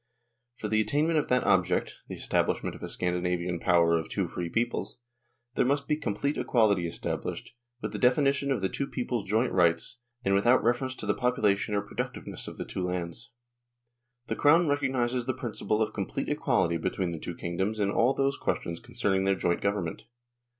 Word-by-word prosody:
..." 120 +1 -52
For 105 - -3
the 110 +1 +2
attainment 155 +7 +2
of - - -2
that 125 0 +2
object 90 -2 +2
(the - - -6
establishment - - 0
of - - -12
a - - -5
Scandinavian 90 -1 -1
Power 85 -2 +4
of 80 - -6
two - - -1
free 85 -1 -4
peoples) 120 +6 -1 0.6
there - - +2
must 140 +2 +1
be 150 - +2
complete 140 0 -2
equality 100 -7 +2
established, 85 - -4 0.3
with - - -2
the - - -4
definition 140 +2 +3
of 130 - 0
the 95 - +2
two 140 +7 -3
peoples' 120 -5 -3
joint 110 +5 +1
rights, 85 +3 +2 0.3
and 95 - +3
without 120 +6 +4
reference 130 +2 +1
to - - -6
the 100 - +2
population 105 -4 +1
or 100 - +2
productiveness 100 - -5
of - - -8
the - - -4
two 95 - -4
lands." 90 +4 -4 0.5
..." 120 0 -54
The - - -3
Crown 165 +4 +5
recognises 130 -4 0
the 130 - 0
principle 110 -3 -1
of 105 - -4
complete - - -3
equality 85 0 +1
between 90 +1 -2
the 85 - -5
two 85 - -6
kingdoms 95 +5 -2
in 100 -1 +1
all 125 +5 +3
those 140 0 +1
questions 85 0 -2
concerning 95 -1 0
their 95 0 +3
joint 85 -2 0
government." 100 -5 -2
110 Hz, 190 wpm, -28 LUFS, 90-125 Hz, 0.6 s, Crown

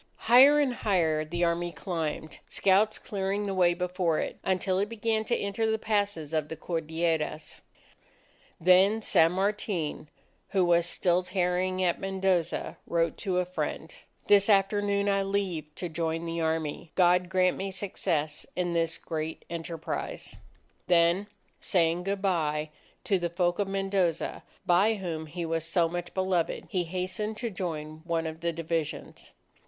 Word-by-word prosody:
Higher 260 +6 +8
and 275 -4 +2
higher 165 -9 +1
the 170 +3 -2
Army 170 0 0
climbed, 160 -4 -4
scouts 200 +3 +3
clearing 200 +1 -2
the 195 - -2
way 175 -2 +3
before 180 -2 0
it, - - -3
until 185 0 0
it 205 +1 0
began 225 -1 0
to 235 - +1
enter 200 +3 -1
the 220 - +1
passes 205 -8 -1
of 155 -1 0
the 160 - -5
Cordilleras. 160 -1 -2 1.0
Then 190 +5 +5
San 165 -4 +4
Martin, 190 -6 -2 0.4
who 190 -2 +2
was 170 -1 +3
still 175 0 +2
tarrying 185 0 0
at 175 -2 +1
Mendoza, 190 -3 -1
wrote 170 0 +1
to 190 -4 -2
a 180 - +2
friend: 180 +1 -4 0.3
"This 200 0 +5
afternoon 200 0 +2
I 195 -1 +2
leave 195 -5 -1
to 180 - -3
join 165 0 -2
the 165 0 -3
Army. 160 0 -2
God 180 0 +4
grant 185 -1 +2
me 195 +1 -4
success 170 -6 -2
in 175 -1 -1
this 165 0 0
great 160 -1 -5
enterprise!" 165 -1 -2 0.5
Then 175 +3 +3 0.3
saying 175 0 +1
good 200 0 -2
bye 155 -5 0 0.3
to 195 -3 +1
the 175 -1 -1
folk 175 +1 0
of 200 - +1
Mendoza, 195 -4 -1 0.2
by 195 +6 +4
whom 165 -5 -4
he 170 +2 -5
was 165 -1 -1
so 170 +1 +2
much 175 +1 -5
beloved, 185 -3 0
he 180 -4 -1
hastened 185 +5 -3
to 235 0 -3
join 155 -4 -5
one 165 -1 -1
of 160 0 -5
the 170 0 0
divisions. 165 -1 -4
180 Hz, 150 wpm, -28 LUFS, 165-195 Hz, 1.0 s, Higher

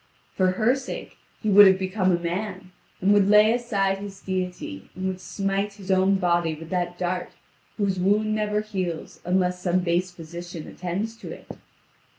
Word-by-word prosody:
For 185 -1 +2
her 220 +6 +3
sake 265 -1 -7 0.2
he 215 - +1
would 205 0 +10
have 190 0 +5
become 190 0 0
a 175 - +3
man, 185 +2 -4 0.3
and 195 +3 +4
would 200 -1 +4
lay 210 +1 +6
aside 200 -5 0
his 200 -1 -8
deity, 180 - -4
and 185 +1 -4
would 185 -1 -3
smite 195 +1 -2
his 195 -1 -6
own 190 +1 +4
body 175 -3 +1
with 160 +2 -11
that 175 -1 -1
dart 180 0 -2 0.4
whose 195 -3 0
wound 210 +3 +2
never 210 -1 0
heals 185 -6 -4
unless 180 0 +1
some 180 0 +1
base 175 +1 0
physician 170 -1 -8
attends 195 +6 -4
to - - -9
it. - - -10
190 Hz, 170 wpm, -25 LUFS, 180-205 Hz, 0.4 s, would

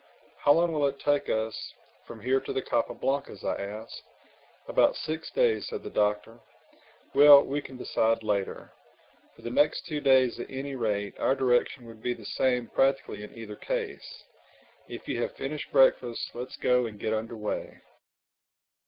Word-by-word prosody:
"How 145 - +5
long 170 +1 +2
will 145 -2 +2
it 140 0 -3
take 145 0 +1
us 110 0 -3 0.3
from 115 -2 -10
here 130 +4 +2
to - - -6
the 130 - -1
Capa - - -1
Blancas?" 135 -7 -2
I - - -1
asked. 105 +3 -7 0.7
"About - - +3
six 160 +1 -4
days," 480 -3 +1
said 445 -3 -6
the - - -7
Doctor—"Well, 115 +6 +3
we 145 +2 -2
can 130 -2 -10
decide 115 -2 0
later. 100 -2 -2 0.6
For - - -18
the 120 - -4
next 150 +7 +2
two 155 -4 -3
days 130 -3 +4
at - - -6
any 135 +1 -5
rate 105 -4 -2
our 135 - +2
direction 125 -1 +1
would 115 -1 -13
be 120 +1 -1
the 110 - -13
same 125 +1 0
practically 135 -3 0
in 105 - -11
either 110 -2 -8
case. - - -5 0.6
If - - -9
you - - -2
have - - -3
finished 145 +2 -5
breakfast 130 -3 +3
let's 125 +2 -7
go 125 -1 +2
and 105 -2 -10
get 110 - -1
under 110 +1 -3
way." 105 -1 -5
125 Hz, 170 wpm, -28 LUFS, 110-140 Hz, 0.7 s, How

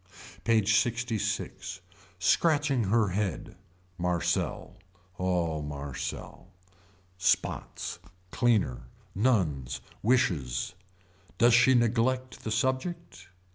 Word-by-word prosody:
PAGE 110 -2 +3
LXVI. 115 -6 -3 0.4
Scratching 145 - +2
her 105 +1 +3
head. 95 -2 -3 0.4
Marcel. 90 -1 -1 0.4
Oh 85 -4 0
Marcel. 70 +3 -6 0.7
Spots. - - -1 0.3
Cleaner. 105 - +1 0.3
Nuns. 85 - +1 0.2
Wishes. 90 - +1 0.6
Does 120 +1 +5
she 125 +2 +6
neglect 125 +2 +1
the - - -3
subject. 130 - -2
105 Hz, 75 wpm, -29 LUFS, 85-125 Hz, 0.7 s, she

